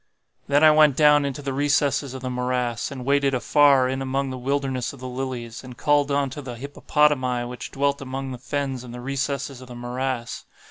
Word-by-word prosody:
"Then 145 +2 +3
I 155 - +9
went 150 -3 +5
down 150 -1 +5
into 140 +1 -4
the 135 -1 -3
recesses 140 -1 +1
of 130 - -8
the 130 - -2
morass, 125 -2 -1
and 130 -3 -7
waded 140 -1 +2
afar 140 0 +4
in 130 +1 -2
among 135 0 -1
the 130 - -5
wilderness 135 -1 -1
of 140 - -13
the 130 - -6
lilies, 125 -2 -5
and 125 -1 -11
called 145 -1 +2
unto 140 0 -1
the 125 -3 -7
hippopotami 135 -1 +1
which 125 0 -7
dwelt 140 0 0
among 135 0 -5
the 125 - -7
fens 135 -1 -3
in 120 -1 -9
the 125 - -7
recesses 135 0 -3
of 130 - -11
the 125 - -10
morass. 125 0 -4
135 Hz, 200 wpm, -24 LUFS, 125-140 Hz, -, I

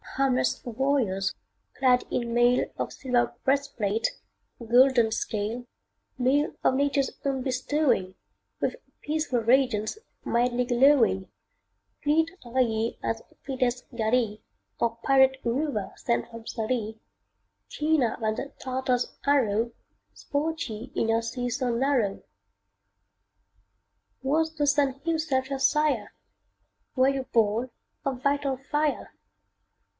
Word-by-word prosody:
Harmless 265 -2 +1
warriors, 230 -6 0 0.4
clad 250 -2 +4
in 235 -1 -1
mail 240 +1 +4
Of - - -3
silver 250 -2 0
breastplate, 265 -6 +1 0.5
golden 240 0 +4
scale; 225 +2 -2 0.5
Mail 270 +4 +2
of - - +4
Nature's 280 0 +1
own 270 -2 -1
bestowing, 255 -7 0 0.4
With - - -1 0.3
peaceful 300 -4 -1
radiance, 235 - +2 0.3
mildly 245 +1 +1
glowing 245 -6 +3 0.7
Fleet 315 +2 +3
are 245 +2 -3
ye 225 -1 0
as 225 0 -2 0.2
fleetest 255 -2 -1
galley 220 -1 0 0.4
Or 230 -1 0
pirate 265 -1 +5
rover 240 -3 -1
sent 235 -1 -1
from 230 -1 -10
Sallee; 220 -1 -3 0.7
Keener 300 -6 +1
than 220 -1 0
the 280 - -5
Tartar's 255 -1 -1
arrow, 235 -5 +2 0.4
Sport 320 +3 -2
ye 225 +3 -7
in 225 - 0
your 225 0 +3
sea 245 +2 -3
so 250 0 -1
narrow. 240 -5 +1 2.0
Was 315 +4 +1
the 290 -2 0
sun 280 -2 +2
himself 310 -5 0
your 275 -1 -2
sire? 275 -5 +2 0.8
Were 260 0 +4
ye 275 -1 -1
born 230 -1 +1 0.3
of 260 -2 -2
vital 280 -1 +1
fire? 295 +2 -1
255 Hz, 110 wpm, -27 LUFS, 230-275 Hz, 2.0 s, pirate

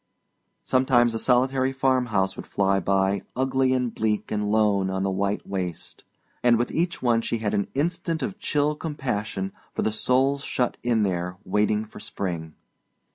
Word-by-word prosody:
Sometimes 130 -2 +3
a 115 - -2
solitary 130 +2 +2
farmhouse 125 -8 +1
would - - -8
fly 95 -1 +2
by, 95 +1 +1
ugly 130 0 +2
and 125 -2 0
bleak 110 -1 -1
and 105 -1 -1
lone 105 -3 +3
on 95 0 -1
the 100 - 0
white 100 +2 -1
waste; 90 -4 -5 0.4
and 120 -1 +5
with 120 - -1
each 170 -2 -1
one 115 -2 +3
she 115 - -1
had 110 -2 -2
an 100 -1 0
instant 165 +2 -1
of 200 -3 -4
chill 150 0 +1
compassion 110 - -3 0.2
for - - 0
the 110 - +1
souls 130 +6 +1
shut 125 -1 -1
in 115 -3 +2
there 90 -1 -2
waiting 105 +2 +1
for 110 - -12
spring. 85 -6 -4
110 Hz, 165 wpm, -25 LUFS, 100-130 Hz, 0.4 s, and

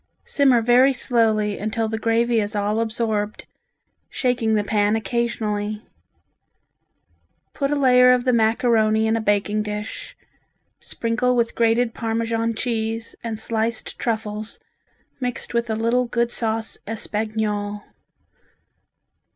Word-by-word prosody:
Simmer 260 -5 +3
very 250 +3 +5
slowly 220 -5 +1
until 220 +2 -1
the 220 0 -3
gravy 230 +1 +2
is 210 0 -2
all 205 +2 0
absorbed, 220 -2 -2 0.6
shaking 235 -4 0
the 210 - +1
pan 205 0 +1
occasionally. 215 -2 -2 1.7
Put 275 -1 -1
a 295 - +1
layer 250 -2 +6
of 250 0 +2
the 255 - +3
macaroni 220 -1 +2
in 220 0 +2
a 225 - -1
baking 205 0 +1
dish, 210 0 -6 0.6
sprinkle 235 +2 -1
with 235 -1 +1
grated 230 0 +2
Parmesan 230 0 -1
cheese 225 -1 -3
and 225 -2 -4
sliced 225 0 -2
truffles 215 -2 -3 0.6
mixed 250 -2 -4
with 235 0 0
a 220 - 0
little 230 +3 +1
good 235 0 0
sauce 225 -1 -2
espagnole. 210 -1 -3
225 Hz, 120 wpm, -22 LUFS, 215-235 Hz, 1.7 s, layer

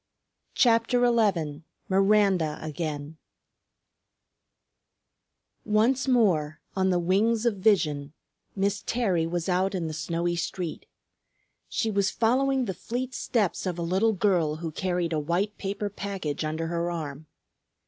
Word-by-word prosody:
CHAPTER 240 +1 +4
XI 190 -11 +1 0.3
MIRANDA 195 -5 +3
AGAIN 155 -1 -5 2.5
Once 235 +6 +2
more, 180 - +2 0.2
on 190 -1 +2
the 180 - +2
wings 210 +6 +2
of 225 -4 +1
vision, 155 -9 +1 0.4
Miss 200 0 0
Terry 190 -9 0
was 170 0 -2
out 190 +1 +1
in 175 -3 -2
the 160 - -4
snowy 170 +2 -2
street. 175 -1 -4 0.8
She 225 - -1
was 200 -1 +2
following 260 +3 +2
the 190 - -3
fleet 245 +7 -4
steps 210 -6 -1
of 180 -2 -2
a 170 - -2
little 190 +6 +2
girl 180 -6 +1
who 165 0 -5
carried 175 0 -1
a 155 - +1
white 175 +7 -1
paper 200 +1 -3
package 195 -7 -4
under 155 +1 -2
her 170 +1 -1
arm. 155 -3 -5
185 Hz, 130 wpm, -27 LUFS, 165-215 Hz, 2.5 s, CHAPTER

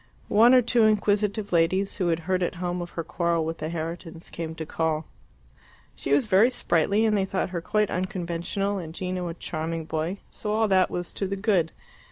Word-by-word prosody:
One 235 +5 +7
or 250 - +6
two 235 +1 +3
inquisitive 210 0 +1
ladies, 185 +4 +2
who 185 -4 0
had 165 -1 +1
heard 185 +2 0
at 175 - -1
home 175 0 -3
of 175 - -5
her 165 - -1
quarrel 170 0 0
with 165 +1 -4
the 155 - -3
Herritons, 165 0 -6
came 160 -1 -5
to 160 - -5
call. 160 0 -1 0.9
She 135 - -4
was 145 +7 +4
very 210 +3 +5
sprightly, 205 -2 +1
and 215 -1 +3
they 195 - +2
thought 190 -1 -2
her 170 -2 -3
quite 210 +3 0
unconventional, 185 +2 -2
and 165 -2 -8
Gino 180 -1 -3
a 165 - -5
charming 165 -1 -4
boy, 160 +4 -2
so 210 - -3
all 220 0 +2
that 185 -1 +4
was 175 -1 -4
to 195 - -2
the 195 - -2
good. 195 -5 +1
180 Hz, 205 wpm, -26 LUFS, 165-200 Hz, 0.9 s, One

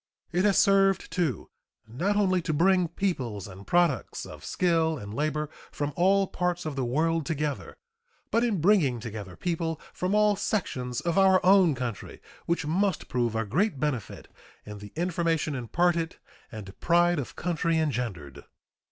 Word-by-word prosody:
It 180 +3 +1
has 200 -2 +3
served, 195 -1 +3
too, 160 - -2 0.4
not 175 - -1
only 185 -3 +2
to 160 - -2
bring 180 +3 +3
peoples 130 - -3
and 100 +1 -12
products 175 -7 +1
of - - -11
skill 165 -3 +1
and 100 -3 -8
labor 150 +3 -1 0.2
from 145 0 -3
all 195 +3 +3
parts 180 -1 -2
of 155 -3 -4
the 135 - -1
world 160 +6 +1
together, 150 -1 -3 0.5
but 230 - +2
in 220 -6 +1
bringing 160 - +3
together 105 -5 -7
people 165 - -2
from 185 +3 -1
all 210 -1 +4
sections 125 - -2
of 170 +4 +1
our 190 -1 +5
own 185 -5 +5
country, 120 -5 -5 0.3
which 170 -2 0
must 185 +3 0
prove 120 -3 0
a 110 0 0
great 175 - 0
benefit 135 -7 -3 0.4
in 105 0 -8
the 105 0 -10
information 165 -2 0
imparted 165 +7 0 0.4
and 100 -3 -9
pride 175 -1 +3
of 135 - -6
country 165 -1 0
engendered. 115 - -3
165 Hz, 155 wpm, -27 LUFS, 125-180 Hz, 0.5 s, our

